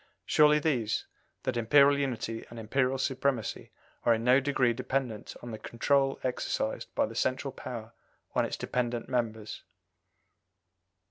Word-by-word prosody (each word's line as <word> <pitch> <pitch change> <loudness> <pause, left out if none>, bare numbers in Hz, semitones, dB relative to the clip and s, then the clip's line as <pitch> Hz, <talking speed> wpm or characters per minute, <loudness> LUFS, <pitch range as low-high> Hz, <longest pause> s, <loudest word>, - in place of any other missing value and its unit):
Surely 150 0 +5
these: 130 -8 0 0.4
that 130 - -1
Imperial 140 +5 +5
unity 115 -4 -2
and 120 - -10
Imperial 130 +4 0
supremacy 130 -4 -1 0.3
are 115 - +5
in 115 - -4
no 125 +2 +6
degree 135 -3 +2
dependent 130 -2 -3
on 120 - -6
the 110 - -6
control 135 +5 +1
exercised 130 -1 -2
by - - +3
the - - -8
central 130 +2 -1
power 115 -4 -7 0.4
on - - +2
its - - -3
dependent 120 -1 -2
members." 110 -4 -2
125 Hz, 135 wpm, -30 LUFS, 115-135 Hz, 0.4 s, no